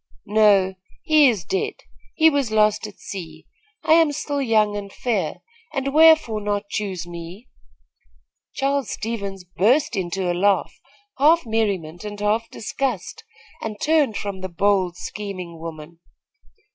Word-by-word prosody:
"No; 205 -3 +4 0.3
he 305 -3 +6
is 210 -8 -2
dead, 420 +3 -2 0.4
he 320 - +5
was 280 -5 0
lost 215 0 +2
at 210 - -13
sea. 160 -5 -8 0.4
I 315 0 +4
am 325 -2 +5
still 285 0 -2
young 215 -4 +2
and 200 -1 -6
fair, 240 +1 -2 0.3
and 275 0 -1
wherefore 315 -8 +5
not 205 0 -2
choose 195 -5 -3
me?" 175 +6 -9 1.1
Charles 280 -1 0
Stevens 200 -4 -4
burst 225 - +2
into 185 -1 -1
a - - 0
laugh, 195 +3 +1 0.5
half 315 +2 +5
merriment 200 -7 -1
and 205 -1 -7
half 215 +2 0
disgust, 270 - -4 0.4
and 215 -2 -5
turned 300 -8 +2
from 200 -2 -5
the 185 - -4
bold, 185 0 +1
scheming 185 -6 -7
woman. 165 0 -9
210 Hz, 135 wpm, -22 LUFS, 190-270 Hz, 1.1 s, he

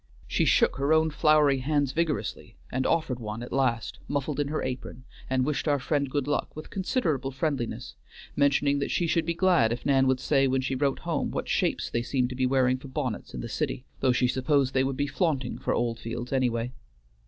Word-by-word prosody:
She - - +1
shook - - +3
her 140 +3 +2
own 160 0 +3
floury 150 -2 +4
hands 145 0 +1
vigorously, 150 - -2 0.2
and 130 +1 0
offered 155 -7 0
one 110 0 -5
at 120 - -8
last, 125 -4 0
muffled 145 +1 -2
in 145 - +1
her 155 +2 -2
apron, 125 0 -5 0.3
and 130 -1 +1
wished 150 +2 -1
our 145 -1 +3
friend 140 0 -1
good 145 0 -1
luck, 145 - -1
with 155 - -9
considerable 180 - -1
friendliness, 135 -3 -3 0.4
mentioning 140 0 +3
that 140 - -2
she 175 - +1
should 165 0 +1
be 170 - 0
glad 170 -11 +3
if 120 - -4
Nan 135 -1 +4
would 130 -1 +2
say 135 0 +2
when 130 0 +1
she 135 +1 -2
wrote 135 +1 +1
home 165 -4 -1
what - - -3
shapes - - 0
they 120 - -1
seemed 125 0 0
to 125 - -6
be 130 0 +1
wearing 130 -1 +2
for 135 - -10
bonnets 130 -4 -4
in - - -4
the - - -5
city, 125 - -3
though 130 - +3
she 125 0 +2
supposed 130 +1 +1
they 130 - +3
would 135 0 -2
be 145 - +1
flaunting 145 -6 -1
for - - -2
Oldfields 120 +1 -3
anyway. 125 -2 0
135 Hz, 210 wpm, -27 LUFS, 125-150 Hz, 0.4 s, floury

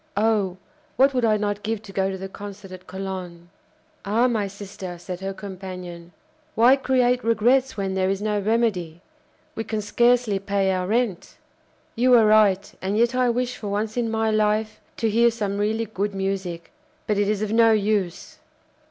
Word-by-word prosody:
Oh! 205 -4 +1 0.4
what 275 +1 +4
would 250 -2 +1
I 215 -1 +3
not 205 0 -2
give 220 0 -3
to 200 - -11
go 195 0 0
to 190 - -4
the 190 +1 -6
concert 200 0 -10
at 185 0 -11
Cologne!" 185 -3 -7 0.5
"Ah! 220 +5 +2
my 220 -5 0
sister," 195 -2 -8
said 180 +1 -7
her 195 +1 -4
companion; 185 -3 -8 0.4
"why 240 +4 +6
create 250 -2 +1
regrets 240 +3 +2
when 195 -1 -2
there 190 0 +1
is 195 0 -1
no 210 0 -1
remedy? 200 -6 0 0.5
We 225 - -4
can 220 0 -3
scarcely 235 0 +2
pay 195 -1 0
our 185 -1 -1
rent." 220 -3 -1 0.6
"You 250 +2 +5
are 225 -2 +6
right, 210 -2 +3
and 195 +2 -1
yet 235 +2 +3
I 250 -1 +2
wish 250 +1 -1
for 210 - -7
once 210 +2 -2
in 240 -2 0
my 220 0 0
life 215 0 0 0.2
to 225 - 0
hear 235 +2 +4
some 205 -3 -3
really 220 +2 0
good 205 -1 -3
music. 190 -3 -3 0.3
But 210 -1 0
it 205 0 +1
is 210 0 0
of 215 - -3
no 225 0 +5
use." 205 -4 -1
210 Hz, 180 wpm, -23 LUFS, 195-225 Hz, 0.6 s, why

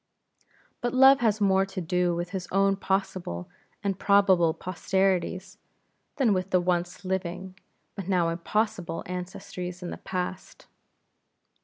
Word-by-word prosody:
IV. - - -44 0.3
But 240 0 -1
Love 265 +1 +7
has 220 -3 +2
more 195 -2 +4
to 195 -1 -5
do 180 0 0
with 175 +1 -4
his 185 -3 -4
own 195 +1 +3
possible 190 - -2 0.4
and 195 -2 -1
probable 190 -5 +4
posterities, 185 0 -1 0.6
than 250 -7 +3
with 185 0 -1
the 185 - +3
once 175 +1 -1
living 185 0 -3 0.4
but 195 -3 -7
now 175 -3 +2
impossible 175 0 -2
ancestries 180 0 -6
in 175 - -5
the - - -6
past. 180 0 -5
185 Hz, 135 wpm, -27 LUFS, 180-195 Hz, 0.6 s, Love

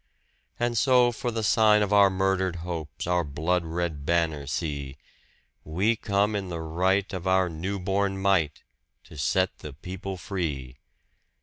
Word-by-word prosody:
And 120 -2 +1
so 125 -2 +5
for 120 +1 -3
the 110 -1 -2
sign 105 0 +5
of 105 0 -1
our 100 -1 +7
murdered 95 -1 0
hopes 80 -4 -5
our 90 0 +1
blood 80 +5 -1
red 80 -3 -3
banner 80 -3 0
see 70 -2 -3 0.7
We 95 +9 +1
come 105 0 0
in 95 -2 -3
the 85 -2 -4
right 95 +5 0
of 95 0 -4
our 95 -1 +3
new 90 +5 -3
born 95 +1 0
might 95 -6 +1 0.4
to - - -14
set 90 +5 0
the 75 - -8
people 95 +5 -6
free! 75 -10 -4
90 Hz, 150 wpm, -26 LUFS, 80-100 Hz, 0.7 s, our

